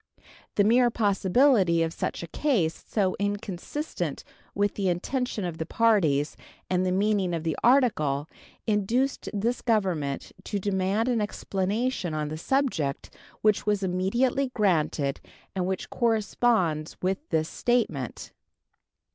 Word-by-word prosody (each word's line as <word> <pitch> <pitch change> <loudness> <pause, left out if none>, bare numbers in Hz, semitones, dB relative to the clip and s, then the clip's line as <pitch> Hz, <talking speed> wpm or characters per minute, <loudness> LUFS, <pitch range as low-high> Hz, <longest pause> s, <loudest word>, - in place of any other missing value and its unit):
The 205 - +4
mere 240 +4 +5
possibility 200 -3 +3
of 165 0 -2
such - - -3
a - - -6
case, 195 - 0
so 195 -4 +1
inconsistent 205 - -3 0.3
with 205 0 +1
the 195 -2 0
intention 215 +4 -2
of 170 -2 -5
the 160 - -2
parties 170 -12 +2 0.4
and 180 0 +2
the 185 - +1
meaning 195 -2 +1
of 160 - -4
the 160 -2 -1
article, 160 - +3 0.4
induced 230 +6 0
this 230 +4 -1
Government 185 - 0
to 205 - -2
demand 195 +3 0
an 240 -3 +1
explanation 205 -1 -2
on 150 -1 -2
the 155 - -5
subject, 200 - -1 0.3
which 215 -1 +2
was 205 -1 +1
immediately 235 +9 +1
granted, 155 -8 +1 0.3
and 185 -1 0
which 190 0 -3
corresponds 215 -8 +1
with 190 +1 +1
this 160 -1 +1
statement. 185 - -1
195 Hz, 130 wpm, -27 LUFS, 170-230 Hz, 0.4 s, mere